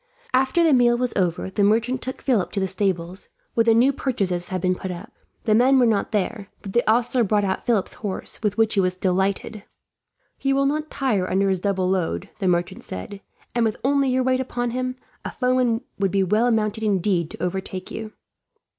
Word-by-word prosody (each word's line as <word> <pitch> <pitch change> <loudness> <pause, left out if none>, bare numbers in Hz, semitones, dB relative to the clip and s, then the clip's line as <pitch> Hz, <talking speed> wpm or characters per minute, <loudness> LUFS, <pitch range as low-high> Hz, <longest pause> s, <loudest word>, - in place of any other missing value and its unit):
After 265 +6 +3
the 320 -3 +4
meal 240 -2 +4
was 250 -1 -1
over, 180 0 -1
the 205 - +1
merchant 230 +5 +2
took 260 - -5
Philip 235 -9 +1
to 200 - -1
the 190 - 0
stables, 185 -1 -2 0.2
where 230 - +3
the 225 -1 +5
new 255 +4 +4
purchases 190 -10 -2
had 185 - -3
been 185 +1 +1
put 185 +1 -6
up. 175 -1 -7 0.3
The 215 - +2
men 255 +5 +5
were 250 - +5
not 220 -3 +1
there, 210 0 -2 0.2
but 195 - -7
the 240 - +3
ostler 240 +2 +3
brought 210 0 +1
out 190 -1 -1
Philip's 225 -5 +1
horse, 205 -3 -5
with 210 -1 -1
which 225 -1 +3
he 200 - +2
was 185 -1 +1
delighted. 190 +3 -1 0.8
"He 275 0 +1
will 275 0 +2
not 305 +2 -1
tire 215 -9 0
under 195 +1 +2
his 190 -1 +1
double 190 -1 0
load," 185 +1 -1
the 195 - 0
merchant 175 -1 0
said; 195 - -7 0.3
"and 240 - +1
with 220 -2 0
only 275 0 +2
your 255 0 +1
weight 255 0 +2
upon 245 -2 -2
him, 255 +1 -2 0.3
a - - -4
foeman 250 -2 +1 0.2
would 195 -1 +2
be 195 +1 +1
well 215 +6 +2
mounted, 220 -1 0
indeed, 190 -5 +1
to - - -7
overtake 185 0 -4
you." 220 -1 -6
215 Hz, 210 wpm, -23 LUFS, 190-245 Hz, 0.8 s, the